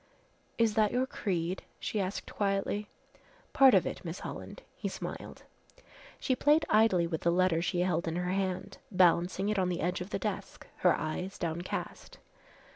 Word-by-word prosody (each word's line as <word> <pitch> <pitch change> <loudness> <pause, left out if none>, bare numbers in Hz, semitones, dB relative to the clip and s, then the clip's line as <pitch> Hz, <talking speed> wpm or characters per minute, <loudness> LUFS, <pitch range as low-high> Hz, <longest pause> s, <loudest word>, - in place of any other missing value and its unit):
"Is 230 -2 +3
that 215 -1 +3
your 250 +1 +1
creed?" 185 -7 -2 0.2
she 210 - -2
asked 190 +2 -4
quietly. 200 +1 -1 0.7
"Part 265 -4 +7
of 185 - +4
it, - - -5
Miss 170 +1 -6
Holland," - - -7
he - - -4
smiled. - - -7 0.8
She 260 - +1
played 300 +4 +4
idly 215 -5 +4
with 165 -2 -3
the 170 - +2
letter 175 -2 +3
she 175 0 0
held 175 -2 0
in 165 - -1
her 180 0 -1
hand, 190 -1 -2
balancing 185 +1 +3
it 210 -2 +1
on 185 -1 +1
the 175 -1 -2
edge 180 +2 -1
of 180 - -5
the - - -1
desk, 200 0 -5
her 180 - +4
eyes 180 +5 -4
downcast. 170 +1 -4
185 Hz, 170 wpm, -31 LUFS, 175-210 Hz, 0.8 s, Part